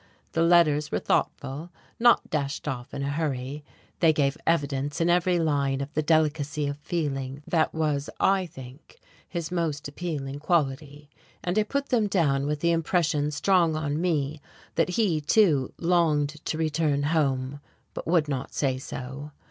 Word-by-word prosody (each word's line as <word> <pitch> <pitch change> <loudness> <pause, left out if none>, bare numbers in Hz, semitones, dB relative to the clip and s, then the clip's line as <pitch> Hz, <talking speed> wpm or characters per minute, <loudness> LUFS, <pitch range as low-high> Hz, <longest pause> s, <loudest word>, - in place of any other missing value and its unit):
The 165 - 0
letters 155 -3 +4
were - - +1
thoughtful 145 +6 -1 0.3
not 240 0 +5
dashed 145 -1 -2
off 125 -4 -4
in 140 - -4
a 140 - -1
hurry; 145 -2 -3 0.4
they 165 -2 +5
gave 140 -2 +1
evidence 145 -3 0
in 170 +1 +3
every 180 0 +3
line 140 -4 +1
of 140 +2 -5
the 155 - +1
delicacy 150 -1 +1
of 145 +1 -3
feeling 140 -4 -3
that 160 -2 +1
was, 150 -3 -1
I 190 -2 +3
think, 130 -1 -13 0.3
his 170 -2 -4
most 160 -5 -2
appealing 145 -3 -4
quality, 145 -2 -1 0.4
and 180 +4 +1
I - - +5
put 280 +6 -2
them 225 -5 +2
down 145 -8 +1
with 150 0 -2
the 170 - +3
impression 165 -2 +1
strong 170 +1 +2
on 155 0 -1
me 155 -4 -1 0.3
that - - +1
he, 180 -5 +1
too, 150 - +3
longed 165 -4 +2 0.2
to 155 - -2
return 155 -2 +1
home, 140 -3 0 0.3
but - - -6
would 165 -2 +3
not 135 -3 -4
say 130 -3 0
so. 135 +3 -7
150 Hz, 160 wpm, -26 LUFS, 140-170 Hz, 0.4 s, not